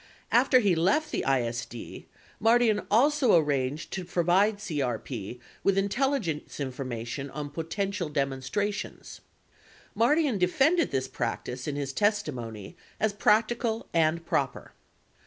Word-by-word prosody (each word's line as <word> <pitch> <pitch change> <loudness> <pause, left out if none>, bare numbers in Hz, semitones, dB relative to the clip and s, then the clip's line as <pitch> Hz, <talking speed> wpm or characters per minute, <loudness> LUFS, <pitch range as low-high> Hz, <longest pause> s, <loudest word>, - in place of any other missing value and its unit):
5 235 - +6
After 260 -1 +4
he 200 -5 +3
left 195 - +1
the - - -1
ISD, 120 -2 -3 0.3
Mardian 225 -1 +3
also 270 +1 +4
arranged 145 -1 0
to 190 - -3
provide 180 +4 +2
CRP 125 - -4 0.2
with 195 -1 +2
intelligence 200 - -1
information 130 0 -4
on 145 0 -6
potential 175 +3 -3
demonstrations. 140 +8 -3 0.7
Mardian 250 +1 +2
de 180 - +4
fended 315 - +3
this 130 -1 -1
practice 125 +1 -4
in 145 - -2
his 140 -2 -3
testimony 130 - -2 0.2
as 220 -1 +1
practical 220 +2 +1
and 165 0 +2
proper. - - -2
175 Hz, 120 wpm, -28 LUFS, 135-215 Hz, 0.7 s, 5